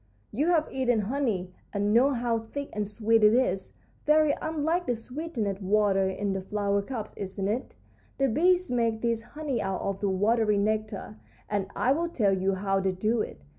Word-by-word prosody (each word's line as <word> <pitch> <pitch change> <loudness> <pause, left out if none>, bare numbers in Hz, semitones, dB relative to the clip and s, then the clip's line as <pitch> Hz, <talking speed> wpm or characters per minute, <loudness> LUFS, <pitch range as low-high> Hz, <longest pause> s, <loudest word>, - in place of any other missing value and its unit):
"You 285 +9 0
have 330 -3 +3
eaten 245 -4 +1
honey, 210 -6 -2 0.2
and 205 0 0
know 250 +5 +5
how 240 -3 0
thick 280 +6 -6
and 210 -1 -2
sweet 220 +1 +2
it 210 +2 +6
is. 195 -7 0 0.3
Very 305 -1 +5
unlike 320 +3 -1
the 245 - +1
sweetened 230 - -4
water 195 -1 +2
in 195 +1 -2
the 190 - -2
flower 200 +1 0
cups, 215 0 -6
isn't 195 0 -4
it? 230 +6 -3 0.4
The 275 - +2
bees 360 +8 +2
make 230 -2 +1
this 230 -1 +1
honey 285 -1 -4
out 195 -1 -2
of 195 -1 -2
the 200 - +1
watery 210 +2 +2
nectar, 210 - -2 0.3
and 205 -2 -1
I 255 - +2
will 335 +4 +1
tell 205 - +2
you 190 +1 0
how 195 0 0
they 190 -1 0
do 215 +5 0
it. 70 - -6
220 Hz, 185 wpm, -28 LUFS, 200-260 Hz, 0.4 s, it